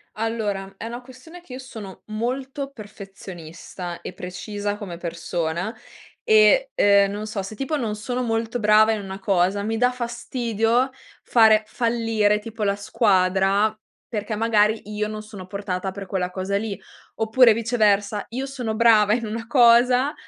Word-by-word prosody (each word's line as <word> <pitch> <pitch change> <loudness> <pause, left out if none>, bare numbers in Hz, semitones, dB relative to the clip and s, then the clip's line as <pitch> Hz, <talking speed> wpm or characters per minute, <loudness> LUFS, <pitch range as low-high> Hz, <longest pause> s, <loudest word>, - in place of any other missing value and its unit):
Allora, 210 -3 -3
è - - -7
una 240 +2 -6
questione 265 +8 -14
che 270 -7 -12
io 255 - -6
sono 220 -7 -10
molto 265 +5 -4
perfezionista 190 - -9
e - - -7
precisa 205 +3 -5
come 180 -5 -7
persona 170 +3 -3 0.5
e, - - +5
ehm, 200 -1 +4
non 210 +1 -5
so, 205 -2 -3
se 215 +3 -8
tipo 275 +6 -2
non 220 -5 -2
sono 245 +4 -3
molto 230 +1 -2
brava 215 +1 +5
in 215 -2 -1
una 190 0 -7
cosa, 195 +1 +1
mi 225 +1 -2
dà 250 +1 +3
fastidio 235 0 -1 0.3
fare 220 -2 +5
fallire, 225 -3 +1
tipo, 220 0 -6
la 200 0 +1
squadra, 200 0 +2 0.3
perché 215 -1 -3
magari 220 -1 +2
io 210 0 -1
non 215 0 -6
sono 205 -4 -10
portata 190 -1 -4
per 195 0 -8
quella 185 -1 -2
cosa 190 +2 -2
lì. 210 -1 -4 0.4
Oppure 225 +2 +5
viceversa, 210 -3 +1
io 260 +3 -4
sono 250 -5 -4
brava 215 -2 +5
in 235 -1 -1
una 225 +2 -5
cosa, 250 +3 +5
215 Hz, 155 wpm, -23 LUFS, 200-235 Hz, 0.5 s, e